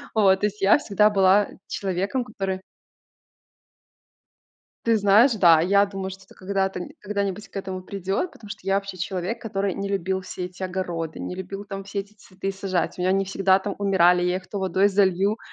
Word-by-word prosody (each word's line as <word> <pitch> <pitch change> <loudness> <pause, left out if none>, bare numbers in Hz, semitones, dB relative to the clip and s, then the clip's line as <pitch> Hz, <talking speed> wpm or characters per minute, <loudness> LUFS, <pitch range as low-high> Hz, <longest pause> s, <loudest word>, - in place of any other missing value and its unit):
Вот, 195 -3 +5
то - - +3
есть 210 0 -8
я 195 +1 +6
всегда 210 -6 +3
была 195 0 +4 0.2
человеком, 195 +6 -2
который 195 -5 -4 2.2
Ты 230 -1 +4
знаешь, 210 +6 +5
да, 170 -7 +5
я 200 +3 +4
думаю, 195 -1 -5
что 190 +1 -11
это - - -18
когда-то 195 0 -2
нь 175 - -6
когда-нибудь 200 0 -3
к - - -14
этому 190 -1 -4
придёт, 195 - -3
потому 210 -8 -14
я 195 - 0
вообще 195 -1 -3
человек, 190 +6 -3
который 200 -3 -2
не 200 +2 -4
любил 190 -1 -1
все 185 -1 -6
эти 180 +1 -9
огороды, 175 -3 -3
не - - -4
любил 190 +2 -6
там 195 -1 -7
все 200 +1 -3
эти 200 +1 -12
цветы 195 -1 -6
сажать. 190 -2 -2
У - - -4
меня 180 - +1
они 195 +1 +2
всегда 190 0 +3
там 195 +1 -4
умирали, 180 -3 +4
я 180 +1 +1
их 185 0 -8
то 205 - -5
водой 190 +1 +2
залью. 195 +1 +2
195 Hz, 190 wpm, -24 LUFS, 185-200 Hz, 2.2 s, я